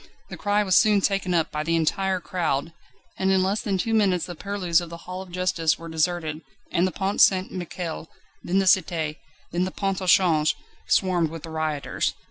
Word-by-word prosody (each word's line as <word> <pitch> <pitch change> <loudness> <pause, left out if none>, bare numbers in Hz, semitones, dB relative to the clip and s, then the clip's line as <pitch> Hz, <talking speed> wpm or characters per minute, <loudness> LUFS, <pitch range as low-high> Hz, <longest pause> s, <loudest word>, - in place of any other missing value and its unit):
The - - -5
cry 205 +1 +1
was 190 -3 +2
soon 210 -2 +5
taken 195 -2 0
up 165 -2 +1
by 150 - -2
the 165 +2 0
entire 185 +4 +1
crowd, 165 -3 -2 0.5
and 190 0 +2
in 190 -1 +3
less 200 +3 0
than 195 -2 -1
two 225 +5 -1
minutes 195 -5 +2
the 175 - -6
purlieus 180 -2 0
of 170 - -7
the 170 0 -10
Hall 185 +1 -6
of 190 - -10
Justice 175 -3 +1
were 165 - -9
deserted, 160 -1 -1 0.3
and 180 +1 +2
the - - -3
Pont 195 +2 -1
St 185 -1 +4
Michel, 175 -2 -5 0.3
then 185 - 0
the 195 - +3
Cité 165 -4 +2 0.4
and 180 +2 +1
the - - -2
Pont 195 0 -2
au 185 - -4
Change, 165 -4 +4 0.3
swarmed 180 -4 +2
with 165 -1 -8
the 165 - -8
rioters. 155 -2 -2
180 Hz, 205 wpm, -24 LUFS, 165-190 Hz, 0.5 s, soon